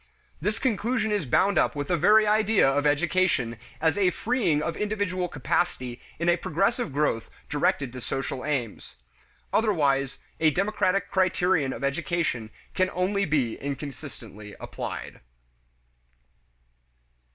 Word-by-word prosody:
This 210 Hz, +6 st, 0 dB
conclusion 230 Hz, -1 st, 0 dB
is 205 Hz, -9 st, 0 dB
bound 195 Hz, +11 st, +3 dB
up -, -, +1 dB
with 145 Hz, -1 st, -3 dB
the 180 Hz, -, +3 dB
very 215 Hz, +6 st, +5 dB
idea 215 Hz, -3 st, +4 dB
of 145 Hz, +2 st, +2 dB
education 150 Hz, -6 st, +1 dB, 0.2 s
as 160 Hz, +5 st, +2 dB
a 190 Hz, -2 st, +4 dB
freeing 180 Hz, -, 0 dB
of 165 Hz, -, -2 dB
individual 205 Hz, -4 st, -1 dB
capacity 130 Hz, -4 st, -1 dB, 0.2 s
in 170 Hz, -, -2 dB
a 175 Hz, 0 st, +4 dB
progressive 195 Hz, -, 0 dB
growth 135 Hz, -5 st, 0 dB, 0.2 s
directed 140 Hz, -3 st, +1 dB
to 130 Hz, -, -7 dB
social 135 Hz, 0 st, -3 dB
aims. 125 Hz, -, -3 dB, 0.6 s
Otherwise 140 Hz, -, +2 dB, 0.2 s
a 160 Hz, -, +5 dB
democratic 195 Hz, +2 st, 0 dB
criterion 180 Hz, -6 st, +2 dB
of -, -, -6 dB
education 140 Hz, -5 st, -1 dB, 0.2 s
can 185 Hz, 0 st, +2 dB
only 200 Hz, +2 st, +1 dB
be 140 Hz, -9 st, 0 dB
inconsistently 135 Hz, -7 st, -7 dB
applied. -, -, -6 dB
165 Hz, 125 wpm, -26 LUFS, 135-195 Hz, 0.6 s, very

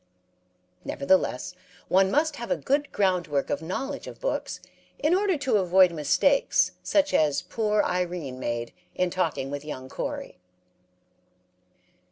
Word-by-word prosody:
Nevertheless, 140 Hz, 0 st, 0 dB, 0.3 s
one 190 Hz, +1 st, +4 dB
must 300 Hz, +4 st, +1 dB
have 235 Hz, -, -6 dB
a 275 Hz, -, +1 dB
good 285 Hz, +1 st, 0 dB
groundwork 180 Hz, -8 st, 0 dB
of 145 Hz, -, -1 dB
knowledge 265 Hz, -, -4 dB
of -, -, -9 dB
books -, -, -3 dB, 0.4 s
in 310 Hz, +3 st, +2 dB
order 385 Hz, -2 st, +2 dB
to 270 Hz, -6 st, +1 dB
avoid 185 Hz, -1 st, +5 dB
mistakes 170 Hz, -, +2 dB
such 295 Hz, -1 st, +1 dB
as 150 Hz, -2 st, +2 dB
poor 215 Hz, -2 st, 0 dB
Irene 175 Hz, -7 st, -2 dB
made 120 Hz, -1 st, -3 dB, 0.2 s
in 180 Hz, -1 st, 0 dB
talking 165 Hz, -7 st, -1 dB
with 145 Hz, 0 st, -4 dB
young 130 Hz, -4 st, -7 dB
Corey. -, -, -5 dB
185 Hz, 130 wpm, -26 LUFS, -, 0.4 s, avoid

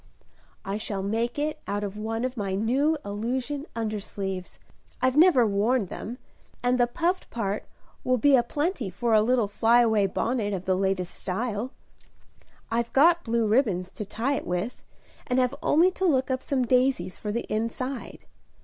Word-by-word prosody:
"I 195 Hz, +2 st, -2 dB
shall 200 Hz, -3 st, -3 dB
make 230 Hz, +5 st, -1 dB
it 300 Hz, +1 st, -1 dB
out 205 Hz, +1 st, -2 dB
of 200 Hz, 0 st, -4 dB
one 225 Hz, +3 st, -2 dB
of 255 Hz, 0 st, -3 dB
my 200 Hz, -4 st, -2 dB
new 265 Hz, +10 st, +2 dB
illusion 255 Hz, +8 st, -3 dB
undersleeves. 200 Hz, -4 st, -4 dB, 0.4 s
I've 255 Hz, 0 st, +2 dB
never 305 Hz, -6 st, +6 dB
worn 215 Hz, +3 st, +2 dB
them; 230 Hz, +6 st, -7 dB, 0.5 s
and 250 Hz, +1 st, +2 dB
the 240 Hz, -, +4 dB
puffed 345 Hz, +8 st, -1 dB
part 205 Hz, -3 st, -3 dB, 0.4 s
will 255 Hz, 0 st, +2 dB
be 275 Hz, +4 st, +5 dB
a 250 Hz, -, +5 dB
plenty 290 Hz, -, -2 dB
for 225 Hz, +6 st, -1 dB
a 215 Hz, -, +6 dB
little 235 Hz, -1 st, +2 dB
fly 230 Hz, +4 st, +4 dB
away 220 Hz, -4 st, +3 dB
bonnet 210 Hz, +1 st, -1 dB
of 185 Hz, -1 st, -4 dB
the 185 Hz, -, +2 dB
latest 190 Hz, -1 st, -1 dB
style. 220 Hz, +4 st, -3 dB, 1.0 s
I've 235 Hz, +1 st, 0 dB
got 335 Hz, +5 st, +5 dB
blue 230 Hz, -1 st, +1 dB
ribbons 210 Hz, -6 st, +1 dB
to -, -, -5 dB
tie 225 Hz, +7 st, -1 dB
it -, -, -3 dB
with, 180 Hz, +7 st, -3 dB, 0.5 s
and 250 Hz, -, 0 dB
have 250 Hz, 0 st, +2 dB
only 340 Hz, +5 st, +4 dB
to 375 Hz, -, -2 dB
look 265 Hz, -6 st, +2 dB
up 260 Hz, 0 st, -1 dB
some 260 Hz, -3 st, 0 dB
daisies 250 Hz, -8 st, +1 dB
for 210 Hz, -, -3 dB
the 235 Hz, +3 st, -2 dB
inside. 230 Hz, +4 st, -4 dB
235 Hz, 170 wpm, -26 LUFS, 205-260 Hz, 1.0 s, never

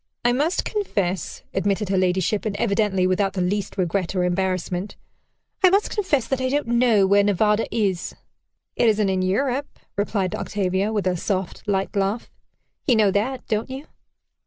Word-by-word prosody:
"I 240 Hz, -, +4 dB
must 300 Hz, +8 st, 0 dB
confess," 195 Hz, -, -2 dB
admitted 200 Hz, +1 st, 0 dB
her 190 Hz, -, +1 dB
ladyship, 185 Hz, +3 st, +1 dB
and 215 Hz, -3 st, -2 dB
evidently 200 Hz, -4 st, +1 dB
without 185 Hz, +1 st, +1 dB
the 185 Hz, -, -2 dB
least 195 Hz, +3 st, -2 dB
regret 185 Hz, 0 st, -1 dB
or 180 Hz, -, +1 dB
embarrassment, 185 Hz, +1 st, -1 dB, 0.7 s
"I 370 Hz, -, +8 dB
must 400 Hz, +3 st, +2 dB
confess 345 Hz, -, +1 dB
that 265 Hz, +1 st, -2 dB
I 255 Hz, -, 0 dB
don't 290 Hz, +2 st, 0 dB
know 235 Hz, -4 st, +3 dB
where 200 Hz, +1 st, +4 dB
Nevada 210 Hz, +2 st, +2 dB
is." 195 Hz, -6 st, -1 dB, 0.6 s
"It 235 Hz, -, +4 dB
isn't 210 Hz, -2 st, +2 dB
in 190 Hz, -1 st, 0 dB
Europe," 255 Hz, +9 st, -1 dB, 0.2 s
replied 200 Hz, -3 st, -1 dB
Octavia, 195 Hz, +1 st, -1 dB
with 205 Hz, -4 st, -1 dB
a 185 Hz, -1 st, +1 dB
soft, 185 Hz, +1 st, -2 dB
light 195 Hz, -1 st, -1 dB
laugh. 200 Hz, +3 st, -1 dB, 0.6 s
"You 250 Hz, -, +5 dB
know 210 Hz, -3 st, +4 dB
that, 245 Hz, +6 st, -1 dB
don't 220 Hz, +2 st, -1 dB
you?" 265 Hz, +3 st, -7 dB
205 Hz, 165 wpm, -23 LUFS, 190-235 Hz, 0.7 s, I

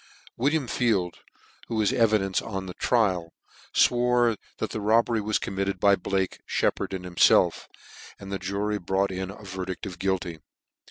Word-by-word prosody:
William 140 Hz, +3 st, +1 dB
Field, 100 Hz, -9 st, 0 dB, 0.5 s
who 115 Hz, -, -3 dB
was 110 Hz, -2 st, +2 dB
evidence 105 Hz, -5 st, +2 dB
on 95 Hz, -3 st, -5 dB
the 90 Hz, -, -7 dB
trial, 95 Hz, -9 st, +1 dB, 0.4 s
fwore 120 Hz, -1 st, +3 dB, 0.2 s
that -, -, -3 dB
the 110 Hz, -, -4 dB
robbery 115 Hz, +1 st, +3 dB
was 105 Hz, +1 st, +1 dB
committed 95 Hz, -1 st, -3 dB
by 100 Hz, +1 st, +5 dB
Blake, 95 Hz, 0 st, -2 dB
Sheppard, -, -, 0 dB
and.himfclf: 90 Hz, -2 st, +3 dB, 0.5 s
and 100 Hz, 0 st, -9 dB
the 100 Hz, -, -2 dB
jury 100 Hz, +3 st, -2 dB
brought 95 Hz, +2 st, 0 dB
in 95 Hz, 0 st, -4 dB
a 100 Hz, +2 st, -10 dB
verdict 95 Hz, -1 st, -5 dB
of 90 Hz, -3 st, -7 dB
guilty. 95 Hz, -3 st, -2 dB
100 Hz, 150 wpm, -26 LUFS, 95-110 Hz, 0.5 s, by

